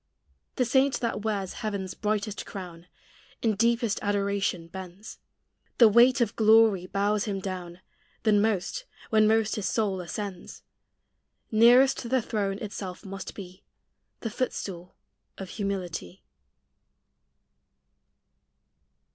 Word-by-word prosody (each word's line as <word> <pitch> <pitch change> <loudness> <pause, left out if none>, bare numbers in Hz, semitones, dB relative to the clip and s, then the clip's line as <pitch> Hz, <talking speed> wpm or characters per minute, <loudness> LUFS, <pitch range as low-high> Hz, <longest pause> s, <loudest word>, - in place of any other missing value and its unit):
The 250 - +1
saint 265 +3 +2
that 230 -3 -2
wears 200 -3 -2
heaven's 200 -4 -3
brightest 210 0 -2
crown, 180 -3 -9 0.6
In 220 -3 +2
deepest 230 0 +1
adoration 200 -3 -1
bends: 190 +3 -10 0.6
The 235 - +8
weight 240 +4 +5
of 225 -3 0
glory 220 -4 +5
bows 205 +2 0
him 200 -3 -2
down 185 -2 -6 0.4
Then 210 -2 +4
most, 220 - -1 0.3
when 215 -1 +5
most 220 0 +2
his 210 - -2
soul 200 -5 0
ascends: 185 0 -7 0.9
Nearest 240 +3 +5
the 260 +1 +3
throne 205 -4 -2
itself 200 -2 -7
must 195 0 -7
be 185 -2 -10 0.6
The 225 - -3
footstool 185 -7 -4 0.4
of 190 -1 -7
humility. 185 - -4
205 Hz, 110 wpm, -27 LUFS, 190-225 Hz, 0.9 s, The